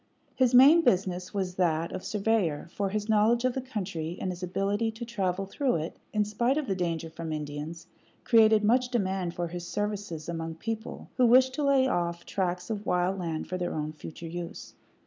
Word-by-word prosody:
His 255 -2 +3
main 285 +7 +8
business 185 - +1
was 190 -3 -2
that 165 -2 +1
of 185 - -5
surveyor, 200 -8 0
for 200 -1 -1
his 210 +1 -2
knowledge 225 +3 +3
of 255 - +2
the 265 - -2
country, 185 -9 -4
and 185 - -2
his 180 0 -8
ability 200 +5 0
to 225 +2 -6
travel 195 -5 -1
through 260 +6 0
it, 160 0 -3 0.2
in 210 -1 +1
spite 235 +6 +1
of 305 - 0
the 200 - -1
danger 170 -3 -2
from 160 0 -6
Indians, 150 +2 -5 0.4
created 220 -3 +5
much 245 +4 +3
demand 190 -7 -1
for 175 -1 -2
his 175 0 -6
services 205 -6 -3
among 165 -1 -4
people 225 +5 -6
who 250 -2 +5
wished 255 +2 +6
to 295 - -2
lay 275 -2 +4
off 170 -5 -1
tracts 180 0 -2
of 210 -1 -4
wild 180 +2 +1
land 165 -3 -3
for 185 - -3
their 175 - -2
own 155 0 -2
future 155 +2 -9
use. 170 +1 -7
190 Hz, 195 wpm, -28 LUFS, 170-225 Hz, 0.4 s, main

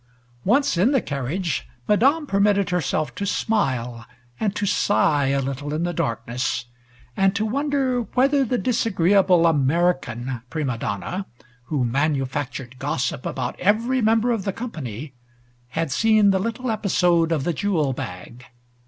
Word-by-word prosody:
Once 275 +2 +2
in 205 +7 +4
the 270 - +4
carriage, 145 - -3 0.2
Madame 275 +9 +3
permitted 200 -4 +2
herself 155 -6 -1
to 200 - -5
smile 130 - -1 0.4
and 210 -2 -1
to 205 - -1
sigh 155 -8 +2
a 140 +1 +1
little 140 +2 -3
in 160 - -1
the 175 0 -1
darkness, 120 -1 -2 0.5
and 195 0 +2
to 215 +1 0
wonder 270 0 0
whether 275 +2 +4
the 250 0 0
disagreeable 195 -7 +3
American 135 -6 +1
prima 145 -6 -2
donna, 175 - -4 0.4
who 140 -4 -1
manufactured 135 -1 -2
gossip 135 -2 -2
about - - -4
every 230 +6 +2
member 225 +2 +3
of 225 -4 -1
the 195 - -1
company, 150 - -6 0.5
had 160 +3 -2
seen 215 - +4
the 190 - +1
little 230 +4 -2
episode 180 -6 +2
of 155 -5 +1
the 175 - 0
jewel 155 -5 0
bag. 115 +4 -8
175 Hz, 140 wpm, -23 LUFS, 135-215 Hz, 0.5 s, in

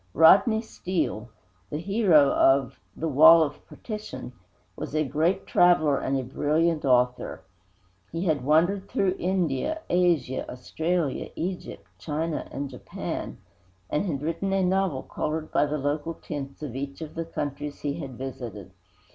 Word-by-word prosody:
Rodney 220 +7 +6
Steele 155 - -3 0.4
the 150 - -3
hero 175 -5 +4
of 135 -2 +3 0.2
The 165 - -2
Wall 160 +3 +8
of 145 -1 -5
Partition 210 - -7 0.4
was - - -6
a 155 0 +2
great 160 +7 0
traveler 155 -5 +4
and 135 - -1
a - - -3
brilliant 155 +5 0
author. 125 -1 +1 0.7
He 165 +3 -3
had 155 -7 +1
wandered 175 +7 +2
through 190 -1 +1
India, 180 - -1
Africa, 170 -7 +1
Australia, 160 +4 -2
Egypt, 180 +2 -5
China 160 +1 -3
and 140 +1 -4
Japan, 130 -2 -6 0.5
and 175 +7 0
had 145 -4 -3
written 165 +5 -2
a 195 -1 +2
novel 185 -6 +1
colored 155 +1 -4
with 145 - +3
the 150 - -1
local 145 +3 -2
tints 140 -1 -7
of 130 -5 -5
each 140 +2 -5
of 155 -1 -7
the 165 - -3
countries 145 -2 -5
he 145 -1 -3
had 130 -3 -7
visited. 120 -7 -7
155 Hz, 145 wpm, -26 LUFS, 135-175 Hz, 0.7 s, Wall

